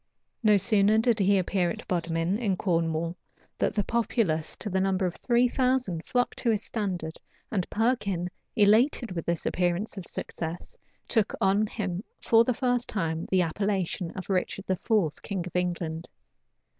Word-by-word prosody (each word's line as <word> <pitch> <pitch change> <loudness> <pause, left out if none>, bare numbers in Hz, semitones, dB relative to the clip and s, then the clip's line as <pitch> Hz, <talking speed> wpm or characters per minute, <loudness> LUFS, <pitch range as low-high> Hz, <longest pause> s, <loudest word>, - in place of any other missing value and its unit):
No 210 -3 +5
sooner 210 +1 +3
did 225 0 +2
he 200 0 +4
appear 185 -1 +1
at - - -6
Bodmin, 170 +2 0
in 200 -6 0
Cornwall, 165 -2 0 0.4
than - - +1
the 205 - +1
populace, 200 -9 0
to - - -6
the 190 -1 0
number 190 0 +1
of 175 - -1
three 245 0 +3
thousand, 250 -10 0
flocked 245 -1 0
to 235 - +1
his 220 -2 +1
standard, 180 -7 -3 0.3
and 190 -5 -1
Perkin, 200 -6 0 0.2
elated 225 +3 +4
with 170 -3 -5
this 170 -1 -1
appearance 180 +3 0
of 180 - -8
success, 165 +1 -5 0.3
took 220 -3 +1
on 200 +2 +3
him, 195 -3 -3 0.2
for 230 0 +5
the 250 - +1
first 245 -1 0
time, 165 -5 -2
the 185 -1 +3
appellation 185 0 -1
of 185 - -5
Richard 195 +1 -1
IV., 185 -3 0
king 190 -4 -3
of 180 - -9
England. 170 -2 -2
195 Hz, 160 wpm, -27 LUFS, 175-220 Hz, 0.4 s, No